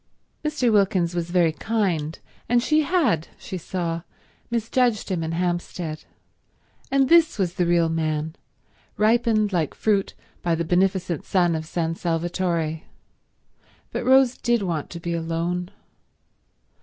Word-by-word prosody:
Mr. 265 Hz, -6 st, +1 dB
Wilkins 190 Hz, -4 st, +2 dB
was 175 Hz, -1 st, -2 dB
very 175 Hz, -2 st, +3 dB
kind, 170 Hz, -5 st, -1 dB, 0.3 s
and 240 Hz, 0 st, +3 dB
she 310 Hz, +2 st, +3 dB
had, 280 Hz, -, +1 dB
she -, -, -7 dB
saw, 170 Hz, -1 st, -3 dB, 0.5 s
misjudged 235 Hz, -1 st, +1 dB
him 175 Hz, -3 st, 0 dB
in 160 Hz, 0 st, -3 dB
Hampstead, 175 Hz, -2 st, -3 dB, 0.8 s
and 270 Hz, 0 st, +3 dB
this 330 Hz, -2 st, +5 dB
was 180 Hz, -4 st, 0 dB
the 180 Hz, -2 st, 0 dB
real 170 Hz, -1 st, +3 dB
man, 155 Hz, -1 st, -1 dB, 0.6 s
ripened 215 Hz, -1 st, +2 dB
like 165 Hz, -5 st, 0 dB
fruit 205 Hz, -3 st, 0 dB, 0.3 s
by 170 Hz, -1 st, +1 dB
the 170 Hz, +1 st, -2 dB
beneficent 180 Hz, -1 st, +1 dB
sun 175 Hz, -3 st, +2 dB
of 160 Hz, -1 st, -3 dB
San 165 Hz, 0 st, -1 dB
Salvatore, 170 Hz, -1 st, -1 dB, 1.1 s
but -, -, -3 dB
Rose 260 Hz, -1 st, +4 dB
did 240 Hz, -3 st, +1 dB
want 165 Hz, -5 st, -2 dB
to 170 Hz, -, -7 dB
be 170 Hz, 0 st, -3 dB
alone. 170 Hz, +2 st, -2 dB
175 Hz, 130 wpm, -24 LUFS, 165-215 Hz, 1.1 s, this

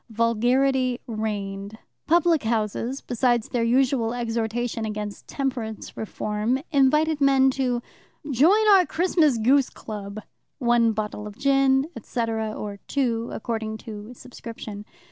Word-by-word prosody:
Vulgarity 245 Hz, +3 st, +2 dB
reigned. 205 Hz, -2 st, -4 dB, 0.3 s
Public 335 Hz, -1 st, +4 dB
houses, 225 Hz, +3 st, -1 dB
besides 240 Hz, -1 st, 0 dB
their 240 Hz, -, -1 dB
usual 245 Hz, -1 st, +2 dB
exhortation 230 Hz, 0 st, -2 dB
against 210 Hz, -1 st, -5 dB
temperance 250 Hz, -6 st, -4 dB
reform, 215 Hz, +2 st, -2 dB
invited 300 Hz, +2 st, +3 dB
men 270 Hz, -1 st, +5 dB
to 250 Hz, -2 st, -1 dB, 0.5 s
"Join 365 Hz, -, +4 dB
our 380 Hz, -4 st, +6 dB
Christmas 320 Hz, -5 st, +2 dB
goose 260 Hz, +4 st, +3 dB
club" 205 Hz, -1 st, -7 dB, 0.4 s
one 240 Hz, -3 st, +3 dB
bottle 210 Hz, -1 st, -4 dB
of 205 Hz, -, -11 dB
gin, 275 Hz, 0 st, +3 dB
etc., 225 Hz, -1 st, -2 dB
or 205 Hz, -1 st, -6 dB
two, 235 Hz, -4 st, 0 dB
according 220 Hz, -1 st, -3 dB
to 215 Hz, 0 st, -8 dB
subscription. 225 Hz, -4 st, -9 dB
235 Hz, 115 wpm, -24 LUFS, 220-270 Hz, 0.5 s, our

